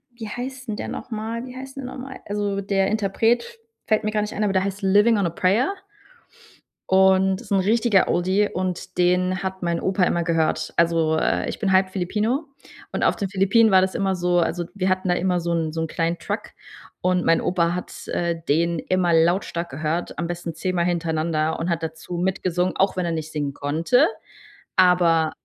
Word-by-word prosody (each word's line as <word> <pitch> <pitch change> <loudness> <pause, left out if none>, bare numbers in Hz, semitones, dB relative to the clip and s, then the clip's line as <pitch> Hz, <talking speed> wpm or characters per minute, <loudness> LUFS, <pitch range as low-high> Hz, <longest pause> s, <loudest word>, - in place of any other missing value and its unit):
wie 225 -2 -7
heißt 255 +1 -6
denn 210 - -1
der - - -4
nochmal? 225 +1 -5
Wie 255 0 -10
heißt 270 +1 -9
denn 270 - -5
der - - -7
nochmal? 260 0 -8
Also 205 -1 -2
der 195 -1 +1
Interpret 225 - 0 0.3
fällt 215 0 +2
mir - - +1
gar 210 -1 0
nicht 210 - -4
ein, 210 - -1
aber 200 -2 +1
der 190 0 +2
heißt 200 +1 -4
„Livin' 205 +4 +4
on 185 - +1
a - - -4
Prayer“ 200 - +2 1.2
und 190 0 +4
ist - - -13
'n 195 - +4
richtiger 215 0 +3
Oldie 190 +4 +1
und 185 0 -4
den 180 +1 +2
hat 190 0 -4
mein 170 -1 -1
Opa 190 -1 +1
immer 175 -1 0
gehört. 165 -2 0
Also, 165 -2 +2
äh, - - 0
ich - - -5
bin 195 -3 0
halb 190 0 +3
Filipino 215 - -1 0.5
und - - -2
auf - - +3
den 200 -3 -3
Philippinen 200 +4 +4
war 190 -1 +6
das 190 0 0
immer 195 -1 0
so 175 0 +1
also 175 0 -1
wir 190 -2 -1
hatten 185 0 0
da 175 - +3
immer 180 0 0
so 170 0 -2
'n 160 -2 -1
so 160 0 -3
'n 160 - -1
kleinen 170 +1 -1
Truck - - -4 0.5
und 180 -1 +1
mein 165 0 +3
Opa 175 -1 +1
hat, 180 - -7
äh, 170 -1 -2
den 170 +2 +2
immer 180 -2 +1
lautstark 170 +1 +1
gehört, 155 +5 -3
am 170 - -2
besten 170 -1 -5
10 185 +3 -2
Mal 170 0 +1
hintereinander 160 -2 -1
und 170 +2 -2
hat 170 -1 -1
dazu 160 +2 -5
mitgesungen, 180 0 0
auch 195 -1 +1
wenn 180 - 0
er 170 - -1
nicht 160 -1 -4
singen 145 -2 -3
konnte. 170 - +2 0.7
Aber 175 -4 +4
185 Hz, 205 wpm, -23 LUFS, 170-205 Hz, 1.2 s, war